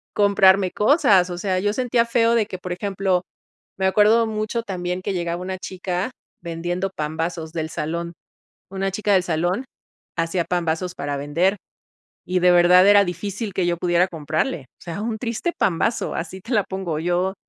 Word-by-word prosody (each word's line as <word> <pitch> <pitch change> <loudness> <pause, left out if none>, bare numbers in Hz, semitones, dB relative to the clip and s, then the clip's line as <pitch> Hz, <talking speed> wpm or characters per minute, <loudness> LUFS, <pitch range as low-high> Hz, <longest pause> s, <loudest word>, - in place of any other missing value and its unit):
comprarme 195 -2 +4
cosas, 210 - +4
o 175 - -5
sea, 185 0 -1
yo 205 +2 0
sentía 245 -1 +1
feo 230 0 +2
de 220 -3 +2
que, 185 - -6
por 180 0 -7
ejemplo, 190 -1 0 0.6
me 190 - 0
acuerdo 215 +4 +4
mucho 215 +2 -2
también 180 -3 -3
que 200 - -2
llegaba 175 -1 -2
una 185 0 -4
chica 185 +1 -3 0.3
vendiendo 175 +3 -3
pambazos 160 +1 -3
del 160 -1 -3
salón. 170 +2 -4 0.6
Una 195 0 -2
chica 205 +1 0
del 185 -2 +4
salón 175 +8 -1 0.5
hacía 165 +1 0
pambazos 175 +1 -1
para 145 0 -3
vender 170 +8 +1 0.7
y 185 0 +1
de 180 0 +5
verdad 180 +2 +6
era 205 0 +7
difícil 200 +4 -4
que 185 - 0
yo 175 0 +1
pudiera 175 +1 +2
comprarle, 155 0 -2 0.2
o - - -19
sea, 175 +3 -5
un 220 -1 -3
triste 235 +9 -2
pambazo. 195 +6 0
Así 175 +3 -5
te 230 +7 -7
la 205 - +3
pongo 190 -5 -4
yo 175 +3 0
185 Hz, 170 wpm, -22 LUFS, 170-205 Hz, 0.7 s, era